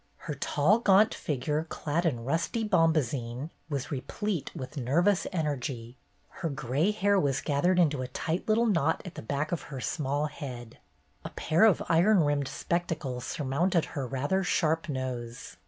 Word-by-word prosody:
Her 155 - -3
tall, 150 - +2
gaunt 210 -1 +5
figure, 150 +3 -2
clad 165 +4 -1
in 120 -7 -2
rusty 165 - 0
bomba 165 -6 +4
zine, 125 +3 -5 0.2
was 140 -4 -3
replete 160 +6 -3
with 130 +3 -7
nervous 170 +9 +2
energy; 135 -8 -3 0.5
her 165 - 0
gray 140 - 0
hair 205 -1 +2
was 140 -5 +1
gathered 165 +5 +1
into 150 -6 +3
a 130 - -3
tight 160 - -3
little 225 +2 +3
knot 165 -7 +1
at 180 - -7
the - - -7
back 145 +6 -2
of 175 - -1
her 135 -3 -5
small 145 +2 -1
head; 125 -6 -7 0.4
a - - -5
pair 165 +7 +3
of 210 -6 +4
iron 180 +4 +5
rimmed 145 -2 +1
spectacles 155 -9 -2
surmounted 160 +5 0
her 135 -3 -3
rather 145 +9 0
sharp 165 -2 +1
nose. 125 -4 -5
150 Hz, 160 wpm, -29 LUFS, 135-175 Hz, 0.5 s, gaunt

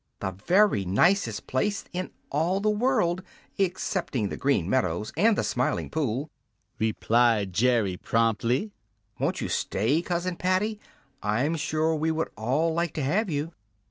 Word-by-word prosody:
"The 95 - -2
very 170 - +3
nicest 110 - +2
place 200 +11 -1
in 185 +1 -3 0.2
all 165 +7 +1
the 215 +1 +2
world 210 -6 +1 0.4
excepting 180 - -1
the - - -4
Green 135 -11 +1
Meadows 105 -4 0
and 210 +7 +3
the - - +1
Smiling 125 +1 -1
Pool!" 140 -1 -2 0.5
replied 110 -2 +2
Jerry 110 -4 +2
promptly. 115 - +1 0.5
"Won't - - -1
you - - -2
stay, 125 - 0
Cousin 175 0 -2
Paddy? 190 +4 0 0.4
I'm 125 +10 0
sure 155 +1 0
we 160 +1 0
would 160 0 -1
all 140 +9 0
like 170 -1 -1
to 150 - -1
have 190 +10 +1
you." 150 +1 -2
150 Hz, 140 wpm, -26 LUFS, 115-180 Hz, 0.5 s, very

